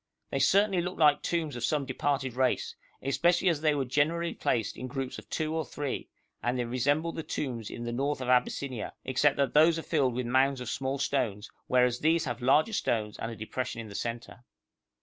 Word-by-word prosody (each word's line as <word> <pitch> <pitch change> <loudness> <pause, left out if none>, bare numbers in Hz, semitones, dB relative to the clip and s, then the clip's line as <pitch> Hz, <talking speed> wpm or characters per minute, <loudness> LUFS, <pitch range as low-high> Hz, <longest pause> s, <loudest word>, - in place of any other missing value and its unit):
They 135 - 0
certainly 195 +6 +4
looked 180 +1 -4
like 150 -3 +5
tombs 160 -5 -1
of 120 - -5
some 150 0 +1
departed 135 -1 -1
race, 130 +1 0 0.3
especially 170 +8 +3
as 160 -4 0
they 155 -2 +3
were 140 -2 0
generally 160 +6 +1
placed 110 -3 -1
in 130 - -6
groups 135 0 -4
of - - -15
two 155 -1 -2
or 160 0 0
three, 145 -3 -4 0.3
and 120 +1 0
they 120 - -1
resembled 145 +8 0
the - - -1
tombs 125 -8 -4
in 120 - -6
the 120 - -3
north 140 +4 -1
of 130 - -4
Abyssinia, 125 -1 0
except 135 +2 +2
that 140 -1 +1
those 160 +2 +6
are 165 - -4
filled 135 -7 +1
with 125 0 -2
mounds 130 +2 +2
of 125 -2 -5
small 135 +1 -2
stones, 120 -7 -1 0.2
whereas 125 -1 +3
these 160 +1 +2
have 120 -1 -4
larger 150 - +3
stones 110 - -1
and 115 - -3
a - - -6
depression 115 +3 -4
in 110 -2 -7
the - - -9
centre. 120 +3 -5
135 Hz, 210 wpm, -29 LUFS, 125-155 Hz, 0.3 s, those